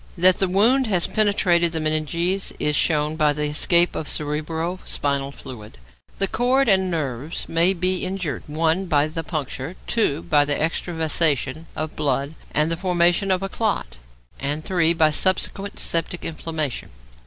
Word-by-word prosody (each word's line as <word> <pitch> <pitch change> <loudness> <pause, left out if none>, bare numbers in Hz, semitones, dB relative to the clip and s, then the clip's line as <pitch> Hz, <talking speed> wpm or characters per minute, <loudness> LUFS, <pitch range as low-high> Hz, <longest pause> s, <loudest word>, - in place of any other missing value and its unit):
That 185 +1 +4
the 195 - +2
wound 230 +8 +3
has 185 -5 +3
penetrated 180 -5 +2
the 160 - -1
meninges 160 +5 -1
is 150 0 0
shown 150 0 +1
by 150 -2 +2
the 150 +1 -2
escape 170 +4 +3
of 155 - -3
cerebro 160 +4 -2
spinal 140 -1 -1
fluid. 110 - -11 0.4
The 195 - 0
cord 255 +6 +1
and 190 -3 +3
nerves 150 -2 -3
may 170 +3 +3
be 185 0 0
injured 185 -5 -3
(1) 165 +5 0
by 150 -3 +2
the 165 +1 -5
puncture; 150 0 -5
(2) 170 -9 0
by 145 -1 +3
extravasation 160 -1 0
of 155 0 -4
blood 140 0 -1 0.2
and 150 +2 0
the 165 - -1
formation 175 +1 +2
of 185 0 +1
a - - -1
clot; 195 - -2 0.4
and 145 +3 -3
(3) 170 -3 +2
by 155 -2 +3
subsequent 195 +4 0
septic 170 +1 -1
inflammation. 155 -4 -4
165 Hz, 155 wpm, -22 LUFS, 150-185 Hz, 0.4 s, That